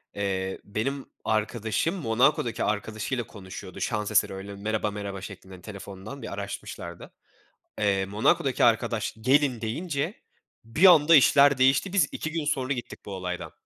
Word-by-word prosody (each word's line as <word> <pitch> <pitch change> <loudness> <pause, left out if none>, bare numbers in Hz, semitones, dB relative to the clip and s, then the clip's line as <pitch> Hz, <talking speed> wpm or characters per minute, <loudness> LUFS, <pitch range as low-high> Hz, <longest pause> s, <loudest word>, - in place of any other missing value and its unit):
eee, 95 -2 -2
benim 135 +7 -3 0.2
arkadaşım 110 - 0
Monako'daki 125 -4 +1
arkadaşıyla 110 +4 -2
konuşuyordu 95 -2 -9
şans 105 -3 -1
eseri, - - +3
öyle, 100 +1 -7
merheba 105 +1 -2
merhaba 100 -2 -5
şeklinde 95 -1 -10
telefondan 100 +6 -9
bir - - -6
araşmışlardı. 100 -3 -7 0.7
Eee, 100 -2 +1
Monako'daki 130 - +2
arkadaş 115 -1 +1
"Gelin." 130 -1 +3
deyince 150 - -2 0.5
bir 115 +12 +4
anda 165 -3 +7
işler 140 -1 +6
değişti. 135 +8 +3
Biz 180 -8 +3
2 160 - -4
gün 165 -2 -2
sonra 135 -2 0
gittik 120 -3 -7
bu 100 - -6
olaydan. 90 -1 -5
110 Hz, 135 wpm, -26 LUFS, 100-140 Hz, 0.7 s, anda